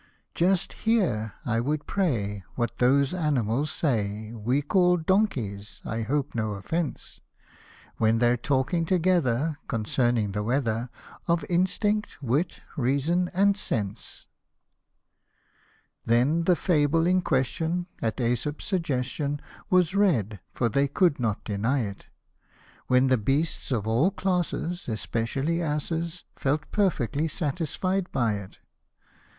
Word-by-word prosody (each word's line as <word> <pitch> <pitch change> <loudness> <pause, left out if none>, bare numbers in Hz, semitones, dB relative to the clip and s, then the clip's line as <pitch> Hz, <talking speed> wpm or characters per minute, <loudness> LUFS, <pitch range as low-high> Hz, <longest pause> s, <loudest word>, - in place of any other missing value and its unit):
" - - -47
Just 180 +1 +1
hear, 170 - 0
I 115 -1 +1
would 145 +5 -1
pray, 105 - -1
what 120 -1 -2
those 135 +3 +3
animals 145 - 0
say 110 -7 -1
We 120 +6 0
call 180 +3 +3
donkeys, 145 - -1
I 115 0 -2
hope 140 +5 -1
no 110 -2 -1
offence; 145 - -4 0.8
When 110 +1 +3
they're 120 +1 +3
talking 135 +7 0
together 160 -5 +1
concerning 115 -1 0
the 105 +1 -2
weather, 120 0 0 0.4
Of 170 -1 +1
instinct, 205 +4 0
wit, 145 +6 -1
reason, 145 +7 +1
and 200 +1 +4
sense." 105 - -4 1.8
127 - - -22
Then 130 +9 +3
the 180 - +5
fable 165 -2 +2
in 185 +1 +3
question, 160 +5 0 0.2
at 110 -1 -1
jEsop's 125 +5 -1
suggestion, 145 -5 -1 0.3
Was 180 -2 +3
read, 125 - +2
(for 120 - 0
they 140 +5 +2
could 155 +1 +2
not 110 -4 -1
deny 115 +7 0
it); 100 -2 -7 0.8
When 125 +1 +4
the 130 -2 +3
beasts 140 +8 -1
of 110 -5 0
all 115 +11 +3
classes, 180 -2 -2
especially 125 +9 -1
asses, 165 +2 -2
Felt 150 +2 -1
perfectly 155 - +1
satisfied 175 +4 -2
by 115 -5 +1
it. 100 -2 -10
140 Hz, 125 wpm, -26 LUFS, 115-170 Hz, 1.8 s, the